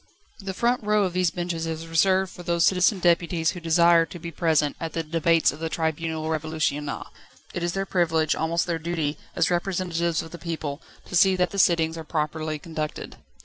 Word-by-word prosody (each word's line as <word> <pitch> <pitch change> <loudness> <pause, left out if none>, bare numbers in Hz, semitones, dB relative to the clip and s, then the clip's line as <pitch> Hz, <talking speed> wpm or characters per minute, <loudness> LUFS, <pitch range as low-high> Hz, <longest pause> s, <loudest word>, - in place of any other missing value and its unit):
The 195 -2 -5
front 240 +2 +1
row 210 0 +2
of 185 -2 -1
these 180 -1 +2
benches 170 -1 -3
is 160 0 -4
reserved 185 +3 +2
for - - -10
those 170 -1 +1
citizen 190 +2 +3
deputies 170 -2 +2
who 180 - -7
desire 170 0 +5
to - - -9
be 170 0 -7
present 155 -2 +1
at 165 -1 -5
the 165 - -2
debates 165 +1 +2
of 145 - -11
the 165 0 -3
Tribunal 160 0 -2
Révolutionnaire. 155 -2 -2 0.5
It 175 - -3
is 175 0 -1
their 195 0 -1
privilege, 160 -4 +1
almost 165 +1 0
their 170 -2 -2
duty, 160 -3 -2 0.2
as 165 +1 +2
representatives 175 -2 -1
of 165 - -11
the 170 - -9
people, 160 -3 -4 0.2
to - - -6
see 190 +1 +5
that 180 -2 +1
the 200 - -3
sittings 165 -3 +3
are - - -6
properly 155 0 -2
conducted. 155 -1 -6
165 Hz, 195 wpm, -25 LUFS, 160-175 Hz, 0.5 s, desire